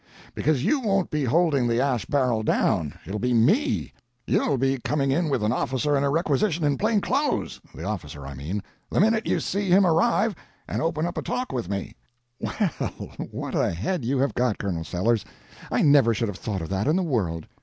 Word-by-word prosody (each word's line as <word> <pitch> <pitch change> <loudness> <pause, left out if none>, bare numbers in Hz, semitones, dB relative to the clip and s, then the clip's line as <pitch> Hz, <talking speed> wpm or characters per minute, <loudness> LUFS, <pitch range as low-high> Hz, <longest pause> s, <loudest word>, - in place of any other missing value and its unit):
"Because 145 -2 0
you 295 - +3
won't 195 -6 0
be 150 -2 0
holding 145 -2 +2
the 115 0 +1
ash 130 -5 0
barrel 125 -6 +1
down, 85 -7 +1
it'll 105 +2 -4
be 125 +1 +1
me. 195 - +2 0.3
You'll 140 - +1
be 135 +1 +1
coming 140 +1 0
in 160 +3 +1
with 130 -6 0
an 105 - +2
officer 135 +3 0
and 140 - +1
a 140 - +2
requisition 160 +2 +1
in 145 -1 +1
plain 215 -1 +2
clothes—the 235 - -2
officer, 70 -1 -5
I 70 - -6
mean—the 85 +10 -5
minute 220 +3 +3
you - - +1
see 200 -1 -2
him 190 +2 +6
arrive 205 +6 +3 0.3
and - - -2
open 160 -1 0
up 175 - -3
a - - -2
talk 250 +1 -3
with 120 -8 -3
me." 100 -1 -3 0.5
"Well, 210 -4 -1 0.6
what - - -5
a - - +2
head 120 - -2
you 130 +4 0
have 135 +2 +1
got, 125 -3 +1
Colonel 90 -5 -3
Sellers! 105 +6 0 0.5
I - - +2
never 140 -6 +5
should 115 +1 -1
have 100 - -6
thought 100 -6 -3
of 80 - -6
that 95 +5 -1
in 155 - +3
the 190 - +1
world." 95 - -1
135 Hz, 200 wpm, -25 LUFS, 110-170 Hz, 0.6 s, him